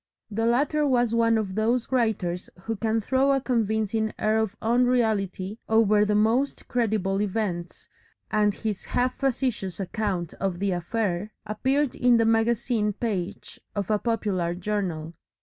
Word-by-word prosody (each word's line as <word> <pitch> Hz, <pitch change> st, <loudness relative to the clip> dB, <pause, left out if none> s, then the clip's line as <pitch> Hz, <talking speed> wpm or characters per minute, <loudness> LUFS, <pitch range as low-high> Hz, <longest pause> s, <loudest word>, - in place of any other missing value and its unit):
The 225 Hz, +2 st, 0 dB
latter 290 Hz, +5 st, +2 dB
was 245 Hz, -3 st, +2 dB
one 230 Hz, -1 st, +3 dB
of 205 Hz, -4 st, -2 dB
those 225 Hz, +4 st, 0 dB
writers 210 Hz, -8 st, 0 dB
who 225 Hz, +4 st, -3 dB
can 220 Hz, +1 st, 0 dB
throw 265 Hz, +5 st, +2 dB
a 270 Hz, -, +2 dB
convincing 220 Hz, -3 st, 0 dB
air 215 Hz, +1 st, +2 dB
of 220 Hz, -1 st, -1 dB
unreality 220 Hz, -4 st, +1 dB
over 215 Hz, -2 st, +4 dB
the 210 Hz, 0 st, +1 dB
most 230 Hz, +6 st, +1 dB
credible 210 Hz, -5 st, 0 dB
events, 190 Hz, -4 st, -3 dB, 0.4 s
and 210 Hz, -1 st, +3 dB
his 215 Hz, -3 st, -4 dB
half 250 Hz, +1 st, 0 dB
facetious 245 Hz, -9 st, -1 dB
account 190 Hz, -3 st, -2 dB
of 190 Hz, -3 st, -1 dB
the 195 Hz, +1 st, 0 dB
affair 185 Hz, +2 st, -1 dB, 0.2 s
appeared 265 Hz, +6 st, 0 dB
in 245 Hz, -1 st, +4 dB
the 230 Hz, -, +3 dB
magazine 225 Hz, -1 st, +1 dB
page 200 Hz, -3 st, -4 dB, 0.2 s
of 205 Hz, +1 st, -2 dB
a 210 Hz, -, +2 dB
popular 200 Hz, -7 st, -1 dB
journal. 180 Hz, -4 st, -3 dB
220 Hz, 145 wpm, -26 LUFS, 195-235 Hz, 0.4 s, over